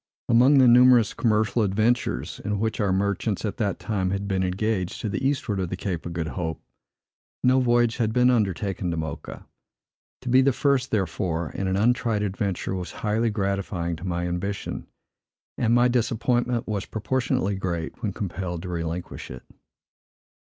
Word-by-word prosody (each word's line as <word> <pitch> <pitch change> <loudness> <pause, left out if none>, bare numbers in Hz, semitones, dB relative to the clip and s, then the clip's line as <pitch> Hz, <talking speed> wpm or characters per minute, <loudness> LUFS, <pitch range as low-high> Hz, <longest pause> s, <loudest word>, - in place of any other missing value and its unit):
Among 125 +5 +5
the 130 -2 +7
numerous 120 -2 +6
commercial 110 +1 +1
adventures, 105 - 0
in 105 0 -1
which 110 +1 -1
our 100 -3 +1
merchants, 100 +2 0
at 105 - -3
that 100 -6 -1
time, 95 -4 -1
had 100 +1 -2
been 95 -1 0
engaged 95 0 -1
to 110 - -2
the 100 +5 -3
eastward 130 -7 0
of 90 -2 -2
the 95 - -4
Cape 90 -4 -3
of 85 - -6
Good 80 -2 -3
Hope, 80 -3 -4 0.8
no 130 +1 +5
voyage 120 -2 +2
had 110 -2 +1
been 125 +2 +4
undertaken 100 -4 0
to 85 - -2
Mocha. 80 -2 -6 0.8
To 125 - -5
be 130 +2 +6
the 135 0 +3
first, 135 -1 +1
therefore, 90 -6 -1
in 95 - -3
an 95 0 0
untried 115 -1 +1
adventure 100 -2 -2
was 90 -2 -4
highly 110 +2 +1
gratifying 100 -4 -2
to 85 - -11
my 90 -1 -2
ambition; 95 +3 -4 0.7
and 115 -1 +1
my 120 +1 +5
disappointment 120 0 0
was 105 -3 -2
proportionately 110 -3 -1
great 85 -2 -4
when 105 -4 -1
compelled 90 -3 -4
to 90 - -6
relinquish 85 0 -4
it. 65 - -9
100 Hz, 165 wpm, -25 LUFS, 90-120 Hz, 0.8 s, the